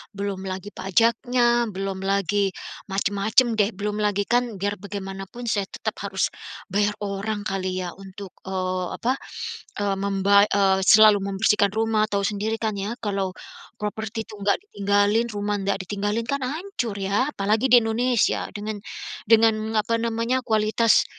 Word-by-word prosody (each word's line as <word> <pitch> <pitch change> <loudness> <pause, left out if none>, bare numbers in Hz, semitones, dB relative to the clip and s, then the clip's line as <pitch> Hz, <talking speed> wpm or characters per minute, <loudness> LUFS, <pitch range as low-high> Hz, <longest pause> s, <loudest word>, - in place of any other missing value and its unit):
belum 200 -1 -3
lagi 190 +2 -5
pajaknya, 235 +4 +2
belum 195 -1 -4
lagi, 200 0 +1 0.4
macam-macam 205 +4 +2
deh. 205 +1 +3
Belum 210 +1 -3
lagi 205 -1 +1
kan, 240 -2 +1
biar 205 +2 -1
bagaimanapun 195 +2 -7
saya 205 -3 0
tetap - - -4
harus, - - 0 0.4
bayar 205 +1 +1
orang 205 +1 -3
kali 185 -1 -2
ya 175 - -4
untuk, 195 0 -10 0.2
eee, 185 -1 -2
apa, 255 +3 0 0.6
e 205 - 0
membay 200 +1 +4
eee, 195 -1 +3
selalu 215 -1 +8
membersihkan 200 +1 +2
rumah, 220 -1 +2
tahu 200 -1 -1
sendiri 215 +1 -1
kan 220 -2 -1
ya 205 +4 -3
kalau, 195 -3 -1 0.5
properti 220 +1 -4
itu 220 - -10
enggak 200 0 +2
ditinggalin, 205 - +1
rumah 205 0 -1
enggak 195 0 -1
ditinggalin, 205 +4 -2
kan 280 0 0
hancur 295 - -3
ya, 200 +6 0
apalagi 210 +5 +1
di 245 -1 +8
Indonesia. 235 +1 +1
Dengan 210 +1 -4 0.5
dengan 220 0 +4
apa 230 +2 0
namanya, 230 +2 0
kualitas 215 +1 +3
205 Hz, 145 wpm, -24 LUFS, 195-225 Hz, 0.6 s, selalu